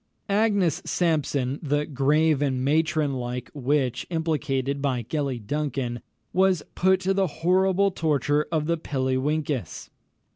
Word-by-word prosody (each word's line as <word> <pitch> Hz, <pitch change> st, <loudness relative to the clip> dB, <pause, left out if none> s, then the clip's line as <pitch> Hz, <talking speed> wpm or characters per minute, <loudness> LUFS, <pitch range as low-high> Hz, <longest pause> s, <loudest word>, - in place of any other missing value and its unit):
Agnes 200 Hz, -5 st, +2 dB
Sampson, 145 Hz, -5 st, 0 dB
the 145 Hz, 0 st, 0 dB
"grave 150 Hz, +2 st, +2 dB
and 130 Hz, -3 st, 0 dB
matron 155 Hz, 0 st, +1 dB
like" 125 Hz, -1 st, -4 dB
witch 135 Hz, -3 st, 0 dB
implicated 140 Hz, -5 st, -1 dB
by 130 Hz, -4 st, 0 dB
Gellie 130 Hz, -3 st, -3 dB
Duncan, 135 Hz, -3 st, -2 dB, 0.3 s
was 185 Hz, -2 st, +3 dB
put 190 Hz, 0 st, +3 dB
to 190 Hz, +1 st, +1 dB
the 195 Hz, -1 st, +2 dB
horrible 190 Hz, +4 st, +2 dB
torture 150 Hz, -3 st, +1 dB
of 155 Hz, -2 st, 0 dB
the 170 Hz, +1 st, 0 dB
pilliewinkis. 135 Hz, -, -2 dB
150 Hz, 120 wpm, -25 LUFS, 135-165 Hz, 0.3 s, was